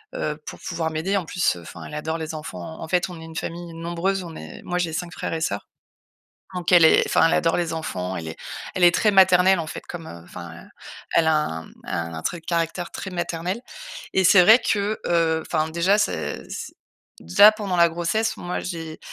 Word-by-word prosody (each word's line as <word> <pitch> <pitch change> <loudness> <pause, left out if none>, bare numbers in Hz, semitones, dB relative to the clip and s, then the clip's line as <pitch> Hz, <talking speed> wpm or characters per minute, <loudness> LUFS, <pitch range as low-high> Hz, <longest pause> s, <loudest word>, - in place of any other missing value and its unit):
heu, 150 0 -2
pour - - -8
pouvoir 165 -2 -3
m'aider. 185 +6 0
En 185 - -2
plus, 175 - +1
heu, - - -10
enfin, - - -10
elle - - -10
adore 160 +2 -2
les 160 0 -5
enfants. 160 +1 -7
En 160 - -5
fait, 180 +1 +1
on 170 -2 -9
est - - -9
une 160 0 -11
famille 170 0 -5
nombreuse. 175 +3 -2
On 165 -2 -9
est - - -9
moi, 180 - -2
j'ai 165 -3 -1
5 175 +1 -3
frères - - -4
et 160 - -3
sœurs. 100 -9 -2 0.9
Donc, 180 -2 -2
elle 170 -2 +8
est - - +6
enfin, 165 - +4
elle - - +1
adore 165 +1 +2
les 170 -2 -1
enfants. 95 - -4
Elle 80 -1 -5
est 80 - -8 0.4
elle 180 - +1
est 175 - +6
très 210 - +3
maternelle, 190 -1 +6
en 160 - -3
fait, - - -7
comme, 165 -2 -7
heu, 85 - -9
enfin, 85 -1 -10 0.5
elle 160 -1 +4
a 160 - +4
un, 80 - -1
mmh, - - -17
un 85 -1 -4
trait 170 - -2
de - - -29
caractère 170 0 -2
très 190 - -6
maternel 175 +3 -3 0.5
et 190 - +3
c'est 180 0 +8
vrai 220 +6 +8
que, 205 +1 0
heu, 165 -2 +2
enfin, 155 -1 0
déjà, 175 +5 +2
c'est 210 - -2
c'est - - -6 0.5
déjà, 145 - +7
pendant 200 -4 -3
la 170 0 +7
grossesse, 175 +7 -1
moi, 175 0 -3
j'ai 165 -3 -6
170 Hz, 225 wpm, -23 LUFS, 160-180 Hz, 0.9 s, elle